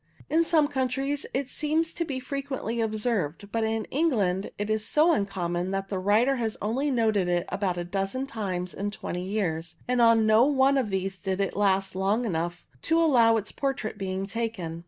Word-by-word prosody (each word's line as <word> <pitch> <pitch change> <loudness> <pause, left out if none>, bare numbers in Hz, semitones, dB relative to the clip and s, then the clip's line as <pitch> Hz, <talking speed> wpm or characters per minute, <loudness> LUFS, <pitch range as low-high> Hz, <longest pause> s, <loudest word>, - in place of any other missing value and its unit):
In 325 +2 +4
some 315 -3 +3
countries 270 +1 -1
it 270 0 -1
seems 315 +3 -1
to 340 - -2
be 275 -5 -4
frequently 265 -3 -3
observed, 215 -5 -1
but 225 -1 0
in 220 0 -1
England 210 - +1
it 205 - -2
is 215 0 0
so 310 +8 +3
uncommon 180 - -1
that 195 0 -3
the 195 - -2
writer 220 +8 +3
has 225 -3 -2
only 255 +8 -1
noted 220 -7 +2
it 175 0 +1
about 190 -3 -1
a 175 - -2
dozen 195 +8 -2
times 190 -8 -4
in 200 +1 -3
twenty 180 -3 -5
years, 170 -5 -2
and 250 -1 +2
on 230 -1 +5
no 220 +2 +6
one 275 0 +4
of 240 -5 -1
these 190 0 -2
did 190 +1 -2
it 195 -2 -1
last 195 -1 +1
long 200 +6 +1
enough 175 -2 -3 0.2
to 325 +1 +2
allow 245 -9 +5
of 220 -2 +1
its - - -8
portrait 265 -6 -3
being 190 0 -2
taken. 195 -6 -4
215 Hz, 195 wpm, -27 LUFS, 190-265 Hz, 0.2 s, no